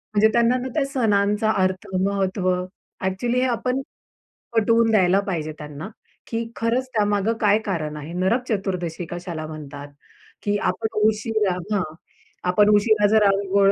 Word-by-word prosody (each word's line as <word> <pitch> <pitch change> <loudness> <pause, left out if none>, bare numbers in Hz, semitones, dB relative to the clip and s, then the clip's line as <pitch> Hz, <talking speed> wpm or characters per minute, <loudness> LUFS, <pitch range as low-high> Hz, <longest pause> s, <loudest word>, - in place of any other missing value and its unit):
म्हणजे 210 +1 +6
त्यांना 235 +1 +4
ना, 255 +1 -4
त्या 285 -3 +1
सणांचा 215 -4 +1
अर्थ, 185 0 -1 0.2
महत्त्व 195 -1 0 0.6
ॲक्च्युअली 235 +7 0
हे 260 - +2
आपण 250 +2 -1 0.8
पटवून 230 +1 +4
द्यायला 190 -3 +4
पाहिजे 155 -5 -2
त्यांना, 150 +5 -8 0.4
की 230 0 -2
खरंच 240 +3 0
त्यामागे 205 0 +1
काय 210 -1 +5
कारण 155 -6 -3
आहे? 150 +3 -7
नरक 190 +8 +1
चतुर्दशी 180 -5 -2
कशाला 175 -2 -5
म्हणतात? 145 -2 -8 0.6
की 205 0 +1
आपण 220 +2 -1
उशिरा 215 -3 0 0.2
हां, 195 - +1 0.7
आपण 205 +3 +4
उशिरा 210 0 +4
जर 215 -1 +4
आंघोळ 195 0 +3
205 Hz, 140 wpm, -23 LUFS, 185-225 Hz, 0.8 s, म्हणजे